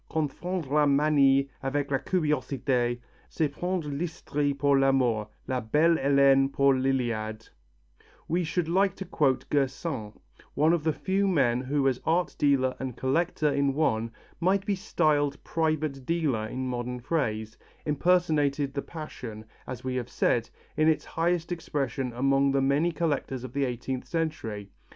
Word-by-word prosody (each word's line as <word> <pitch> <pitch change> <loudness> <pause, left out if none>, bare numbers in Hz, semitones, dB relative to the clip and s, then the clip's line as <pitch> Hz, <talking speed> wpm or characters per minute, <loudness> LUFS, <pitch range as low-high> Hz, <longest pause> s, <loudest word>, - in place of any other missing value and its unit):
confondre 160 0 -3
la 150 0 +4
'manie' 140 -1 +4
avec 140 +1 -2
la 135 - +2
curiosité, 135 -8 0 0.3
c'est 155 -3 0
prendre 180 -2 -3
l'hysterie 145 -1 -2
pour 140 0 +2
l'amour, 130 -6 +2 0.2
'la 130 -1 0
Belle 155 +9 +3
Helenè' 135 0 +4
pour 140 0 +4
l'Iliade" 120 -5 -1 0.8
we 175 +2 0
should 165 +1 -1
like 190 +2 +2
to 195 - -6
quote 135 -7 +1
Gersaint, 135 -5 -2 0.4
one 155 +3 +4
of 170 -3 0
the 160 - +2
few 195 +5 0
men 130 -9 +2
who 135 +1 0
as 130 -2 0
art 175 +2 +1
dealer 135 -3 +2
and 130 -3 -5
collector 150 +2 +1
in 140 -1 +1
one, 135 -8 +1
what - - -17 0.3
might 190 +3 +2
be 205 - +1
styled 150 -7 +1
private 155 -4 -1
dealer 140 -8 0
in 130 +3 -4
modern 125 0 -3
phrase, 110 -6 -2 0.3
impersonated 150 -3 +1
the 140 - -2
passion, 125 -10 -8 0.2
as 130 -3 -6
we 130 0 -2
have 125 -1 -4
said, 120 -1 +1 0.3
in 155 - +3
its 160 -2 +2
highest 170 +1 -1
expression 135 -6 -2
among 135 +2 +2
the 135 - +2
many 140 +5 +2
collectors 145 -6 -2
of 130 -1 -8
the 140 -1 +1
eighteenth 125 +1 -4
century. 115 - -3
140 Hz, 150 wpm, -27 LUFS, 130-160 Hz, 0.8 s, la